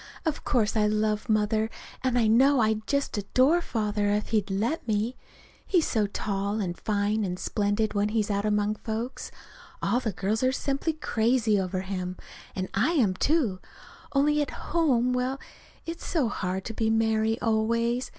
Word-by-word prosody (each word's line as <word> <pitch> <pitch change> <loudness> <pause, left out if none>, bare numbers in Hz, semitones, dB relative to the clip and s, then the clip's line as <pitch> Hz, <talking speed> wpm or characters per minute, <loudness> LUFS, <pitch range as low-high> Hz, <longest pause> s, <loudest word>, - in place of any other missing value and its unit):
Of 315 -2 -1
course 230 -6 +1
I 210 -1 +3
love 215 +1 0
Mother, 215 +1 +2 0.3
and 255 -2 +1
I 235 - +3
know 260 +5 +5
I'd 220 -1 +1
just 280 -1 0
adore 260 - +3
Father 210 -7 -1
if 210 +1 0
he'd 210 -3 +1
let 225 +10 -1
me 220 +3 0 0.5
he's 355 -5 +2
so 215 -3 +1
tall 200 +1 -2
and 180 -4 -2
fine 210 +1 0
and 180 -2 -2
splendid, 205 +3 0
when 205 0 +1
he's 215 -1 0
out 200 0 0
among 210 0 +1
folks. 225 +4 -4 0.5
All 245 - +1
the 235 -4 -2
girls 195 +5 -1
are 255 0 +3
simply 275 +4 -1
crazy 230 -6 +1
over 185 0 -2
him. 185 -1 -4 0.4
And 185 -1 -2
I 220 +12 +2
am, 230 - +3
too. 235 - +1 0.5
Only, 295 +1 +3
at 290 - -1 0.2
home 255 -7 +3
well, 255 +2 -1 0.5
it's 330 0 -6
so 290 -9 +1
hard 190 -2 -3
to 225 - -4
be 220 0 0
Mary 220 0 +2
always. 230 +2 +1
220 Hz, 170 wpm, -27 LUFS, 205-250 Hz, 0.5 s, know